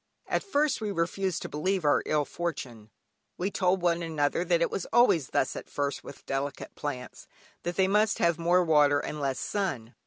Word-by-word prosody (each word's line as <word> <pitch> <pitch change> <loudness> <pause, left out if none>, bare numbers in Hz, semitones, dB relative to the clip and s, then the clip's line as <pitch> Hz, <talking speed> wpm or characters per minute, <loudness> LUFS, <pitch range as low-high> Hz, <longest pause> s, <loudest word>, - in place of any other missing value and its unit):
At - - 0
first 300 - 0
we 215 - -2
refused 185 0 -1
to - - -4
believe 185 +3 -1
our 145 - +4
ill 150 -1 +1
fortune; 125 -12 -5 0.5
we 190 +3 -1
told 185 -1 +1
one 170 -1 +2
another 160 -1 0
that 175 -1 +2
it 170 - +1
was 190 - -3
always 180 - +4
thus 130 - 0
at - - -8
first 140 -1 -2
with - - -11
delicate 140 +1 -4
plants, 130 -4 -6 0.3
that 175 0 -3
they 190 -1 +3
must 210 +2 +2
have 170 -1 +2
more 175 +2 +3
water 150 -3 +4
and 150 - -5
less 135 -2 -1
sun. 140 - -3
170 Hz, 190 wpm, -28 LUFS, 145-190 Hz, 0.5 s, our